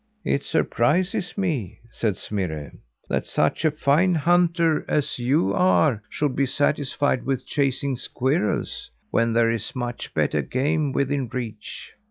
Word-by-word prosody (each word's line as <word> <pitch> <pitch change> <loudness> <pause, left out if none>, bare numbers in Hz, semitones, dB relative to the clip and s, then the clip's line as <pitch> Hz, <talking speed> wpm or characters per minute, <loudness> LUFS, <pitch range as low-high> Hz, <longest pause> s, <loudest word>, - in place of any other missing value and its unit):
"It 140 - +1
surprises 175 - 0
me," 155 - -2
said 110 -5 -1
Smirre, 80 -8 -4 0.4
"that - - 0
such 75 - 0
a 160 - +5
fine 155 +5 +2
hunter 170 0 +3
as 145 -3 0
you 135 +8 +2
are 160 - +3
should 145 -3 -1
be 140 0 +1
satisfied 145 -1 0
with 135 -2 -2
chasing 140 -1 0
squirrels 130 - -1 0.2
when 115 0 +2
there 115 0 +3
is 115 +2 -4
much 120 -2 -4
better - - +1
game 145 +3 0
within 140 -1 0
reach." 115 -3 -6
140 Hz, 135 wpm, -24 LUFS, 120-155 Hz, 0.4 s, a